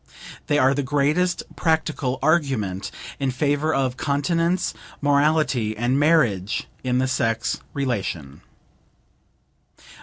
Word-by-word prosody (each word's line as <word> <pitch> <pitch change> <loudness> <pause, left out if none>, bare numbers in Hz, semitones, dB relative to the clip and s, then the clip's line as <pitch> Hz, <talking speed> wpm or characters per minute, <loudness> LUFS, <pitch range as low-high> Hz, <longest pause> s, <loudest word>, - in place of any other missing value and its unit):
They 145 - +2
are 135 -1 +4
the 145 - 0
greatest 145 +7 +1
practical 155 -5 0
argument 135 - +1 0.3
in 135 -1 0
favor 145 +4 0
of 130 -3 0
continence, 165 +5 0 0.3
morality 145 -6 +2
and 120 +4 +1
marriage 125 - +2 0.2
in 125 -1 +1
the 130 +1 +1
sex 115 -2 0 0.2
relation. 100 - -3
140 Hz, 100 wpm, -23 LUFS, 120-155 Hz, 0.3 s, are